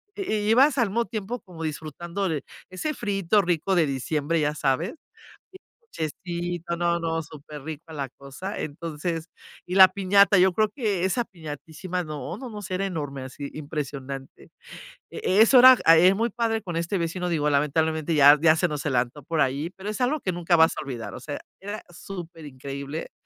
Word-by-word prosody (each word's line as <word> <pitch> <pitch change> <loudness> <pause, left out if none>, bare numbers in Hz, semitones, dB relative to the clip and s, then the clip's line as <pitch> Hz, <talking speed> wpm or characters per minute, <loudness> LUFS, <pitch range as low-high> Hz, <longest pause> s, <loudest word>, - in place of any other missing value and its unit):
i 395 - -3 0.2
ibas 275 +4 +5
al 235 -5 +2
mismo 230 +3 0
tiempo 220 +2 -4
como 170 -4 -10
disfrutando 170 +5 -4
de 150 -3 -2 0.3
ese 185 +12 -3
friíto 200 -3 +1
rico 175 +1 0
de 170 -3 +4
diciembre, 150 +4 -1
ya 150 0 +1
sabes, 150 - 0 0.6
el 375 - -13 0.2
ponchecito, 175 - -4
no, 170 0 +1
no, 165 -1 -2
superrico 155 +1 -9
la 140 -3 -4
cosa, 140 - -8
entonces, 165 +2 -4 0.4
y 180 - -4
la 190 -1 +9
piñata, 200 +1 +4
yo 185 0 +5
creo 215 0 +2
que 205 -9 -1
esa 235 +6 +1
piñatísima 165 +2 -6
no, 155 - -6
no, 255 -1 -7
no, 210 -2 -8
sí 185 - -7
era 195 +1 -1
enorme 145 -7 -4
así 135 +2 -7
impresionante, 140 -3 -6 0.6
e 195 +3 +1
eso 245 +3 +7
era 255 -1 +9
era 165 +4 +7
muy 230 +3 0
padre 225 -1 -1
con 175 -3 -5
este 170 +3 -1
vecino, 175 +2 -2
digo, 150 -3 +1
lamentablemente 155 +2 +1
ya 145 0 +8
ya 160 -1 +6
se 180 +1 +1
nos 150 0 -4
adelantó 130 +1 -1
por 160 +3 -1
ahí, 140 +5 0
pero 190 +2 -9
es 215 - -4
algo 290 +5 +1
que 185 - -2
nunca 170 0 +2
vas 160 0 +4
a - - -3
olvidar, 115 -7 -6
o - - -8
sea, 145 +3 -6 0.2
era 205 +2 -6
superincreíble, 150 -5 -7
170 Hz, 180 wpm, -25 LUFS, 150-195 Hz, 0.6 s, la